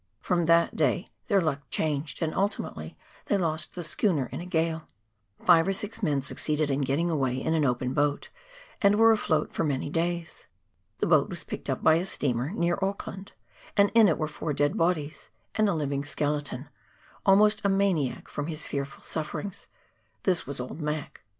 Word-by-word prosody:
From 175 -3 0
that 170 0 +4
day 160 +5 0 0.2
their 200 -3 +4
luck 155 -5 -1
changed, 150 +1 -1
and 160 - -1
ultimately 200 +2 -2 0.3
they 205 - +2
lost 160 -3 -1
the 175 - -4
schooner 160 -3 +1
in - - -5
a 175 - -7
gale. 160 -1 -1 0.6
Five 165 -1 +6
or 195 - +2
six 210 +3 -3
men 145 -8 +1
succeeded 150 +2 0
in 135 +1 0
getting 140 +6 +1
away 135 -5 0
in 160 - -1
an 160 -2 +2
open 125 0 0
boat, 145 0 0 0.5
and 200 0 +5
were 225 +1 +6
afloat 155 -8 +1
for - - 0
many 145 -2 -1
days. 170 0 -2 0.5
The - - +3
boat - - +4
was - - -3
picked - - -6
up - - -2
by 160 0 +6
a 175 - -1
steamer, 125 -5 0
near 175 -1 0
Auckland, 195 0 -4 0.4
and 200 0 +5
in 225 -2 +7
it 165 - +2
were 155 - -1
four 150 0 -4
dead 145 +1 +1
bodies, 160 -3 -1 0.2
and 215 -1 +2
a 195 - +1
living 140 -2 -1
skeleton, 145 -2 -3 0.5
almost 210 +2 +5
a 200 - +3
maniac 195 -9 +1
from 145 0 -4
his 155 -2 -4
fearful 140 -1 -4
sufferings 180 +5 -4 0.3
— - - -42
this 180 -7 +1
was 140 -1 -5
old 125 +6 -6
Mac. 150 -1 -4
160 Hz, 185 wpm, -27 LUFS, 145-185 Hz, 0.6 s, in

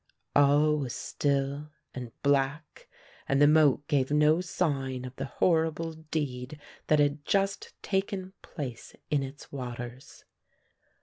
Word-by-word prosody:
All 145 +2 +5
was 130 -4 -3
still 140 +1 -1 0.2
and 125 -2 -6
black 140 +2 0 0.4
and 135 - +3
the 145 - +7
moat 145 -2 +4
gave 135 -3 +1
no 150 +3 +4
sign 135 -8 -1
of 130 +1 -8
the 135 - -3
horrible 160 +1 +1
deed 150 -3 -4 0.3
that 155 - +4
had 145 0 +2
just 195 +4 0
taken 190 -1 -2
place 130 -7 -7 0.2
in 145 -2 +3
its 135 +1 -8
waters. 125 -1 -7
145 Hz, 125 wpm, -29 LUFS, 135-155 Hz, 0.4 s, the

